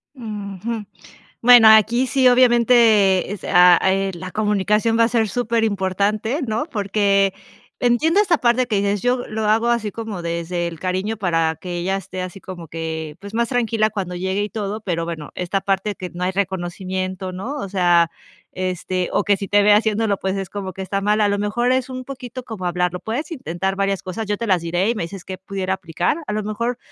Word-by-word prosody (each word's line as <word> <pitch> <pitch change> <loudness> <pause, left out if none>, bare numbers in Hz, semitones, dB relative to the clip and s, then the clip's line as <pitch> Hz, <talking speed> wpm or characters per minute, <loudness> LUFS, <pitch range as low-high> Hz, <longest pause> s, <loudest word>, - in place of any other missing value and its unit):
Ujú. 210 -2 -5 0.6
Bueno, 240 -2 +8
aquí 225 +4 +5
sí, 260 -1 +3
obviamente 235 -6 +4
es, 205 - -6
eh, 190 +2 +4
la 185 +1 -7
comunicación 210 +2 +1
va 230 - +6
a - - +2
ser 225 -2 +1
superimportante, 215 - 0
¿no?, 220 +4 -1
porque 200 -2 +1 0.5
entiendo 305 +10 +3
esta 355 -5 +3
parte 245 0 +2
que 220 - -1
dices 200 0 0
yo 245 +2 0
lo 220 0 -2
hago 225 +2 +3
así 235 -3 0
como 220 -3 -6
desde 170 +1 -3
el 165 -2 -6
cariño 190 +5 -2
para 165 -5 0
que 175 +1 -5
ella 190 +3 -1
esté 185 -1 -6
así 185 +1 -7
como 175 -5 -9
que, 160 -1 -5
pues, 200 0 -9
más 235 0 +1
tranquila 230 -3 +1
cuando 190 -4 -4
llegue 190 +3 -1
y 210 - -3
todo. 210 0 -4
Pero 170 -5 -2
bueno, 160 -3 -6
esta 185 +2 -2
parte 195 +1 -1
que 180 -1 -7
no 175 0 -7
hay 185 - +1
reconocimiento, 185 0 -3
¿no?, 230 +11 -5
o 200 -9 -4
sea, 175 -3 +3 0.4
este, 185 0 -2
o 205 - +2
que 200 0 +2
sí 200 - -5
te 205 +1 +3
ve 205 0 +5
haciendo, 220 +1 +2
pues, 190 +1 -2
es 195 -2 -5
como 195 -2 -5
que 190 - -7
está 195 +1 -2
mal. 210 +2 +1
A 210 - +3
lo 200 - 0
mejor 215 +4 0
es 255 0 +1
un 255 0 -6
poquito 255 -1 -8
como 215 -7 -6
hablarlo. 180 0 -1
Puedes 240 - -4
intentar 195 - -3
varias 195 -1 -1
cosas. 215 +4 -5
Yo 205 0 -1
te 230 - -3
las 185 -3 +3
diré 175 +5 0
y - - 0
me 170 - -2
dices 185 +2 -8
que 185 -1 -7
pudiera 190 0 -3
aplicar 175 - -1
a - - -3
lo 215 0 -1
mejor 230 +4 -2
200 Hz, 205 wpm, -21 LUFS, 185-225 Hz, 0.6 s, Bueno